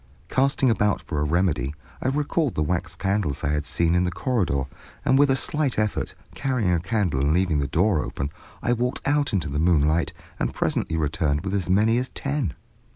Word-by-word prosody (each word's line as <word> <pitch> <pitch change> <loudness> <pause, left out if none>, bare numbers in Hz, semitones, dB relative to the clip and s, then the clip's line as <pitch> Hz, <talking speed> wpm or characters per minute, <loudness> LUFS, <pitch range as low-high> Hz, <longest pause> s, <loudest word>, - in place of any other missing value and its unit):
Casting 135 -1 +3
about 105 -2 +2
for 75 - -4
a - - +1
remedy, 75 -3 0 0.3
I - - -1
recalled 145 +1 0
the 75 - +1
wax 85 +2 -2
candles 95 -7 -1
I 70 - +1
had 75 0 -1
seen 85 +1 +1
in 90 0 +3
the 90 - +1
corridor, 90 - 0 0.4
and, - - +4
with 145 0 +5
a 135 - +4
slight 150 -1 0
effort, 105 -1 -1 0.2
carrying 120 -9 0
a 85 - +2
candle 95 - 0
and 70 +3 +2
leaving 90 -5 +2
the 70 - 0
door 85 +2 +2
open, 70 +2 -4 0.3
I 120 - +2
walked 125 +3 -2
out 145 0 +2
into 90 -6 0
the 70 +1 -2
moonlight, 80 -1 +3 0.3
and - - -1
presently 80 - 0
returned 75 -1 0
with 95 0 -4
as 95 -3 -1
many 110 +5 +4
as 130 - -2
ten. 140 - -2
90 Hz, 200 wpm, -24 LUFS, 75-120 Hz, 0.4 s, with